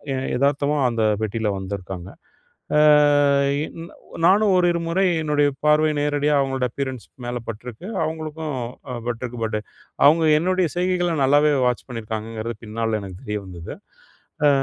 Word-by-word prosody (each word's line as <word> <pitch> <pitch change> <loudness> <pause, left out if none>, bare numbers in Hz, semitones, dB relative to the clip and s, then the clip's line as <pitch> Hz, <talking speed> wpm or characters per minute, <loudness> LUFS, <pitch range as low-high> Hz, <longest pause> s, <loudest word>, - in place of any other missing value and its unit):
எ - - -2 0.2
எதார்த்தமா 140 +2 +1
அந்த 115 -2 -1 0.2
பெட்டியில 110 0 -1
வந்திருக்காங்க. 95 -1 -6 0.7
அ 150 - +5 0.8
இ - - 0 0.6
நானும் 205 +2 +5
ஓரிரு 175 -1 +2
முறை 190 +3 +2 0.2
என்னுடைய 145 -1 +2 0.2
பார்வை 150 +1 +4
நேரடியா 145 0 +1
அவங்களோட 135 -2 0
அப்பியரன்ஸ் 130 -2 -5 0.2
மேலே 120 0 -3
பட்டிருக்கு. 115 - -7 0.2
அவங்களுக்கும் 155 -1 -4
ம் 120 - -5 0.2
அ - - -4
பட்டிருக்கு. 120 0 -4
பட் 110 -1 -2 0.5
அவங்க 160 +2 +5 0.2
என்னுடைய 185 0 +1
செய்கைகளை 180 -1 +1
நல்லாவே 145 +2 +4
வாட்ச் 125 -1 -1
பண்ணியிருக்காங்கங்கிறது 115 -1 -5
பின்னால 110 0 -2
எனக்கு 95 -1 -9
தெரிய 105 0 -3
வந்தது. 85 -2 -8 0.7
அ - - +7
135 Hz, 135 wpm, -22 LUFS, 110-155 Hz, 0.8 s, அ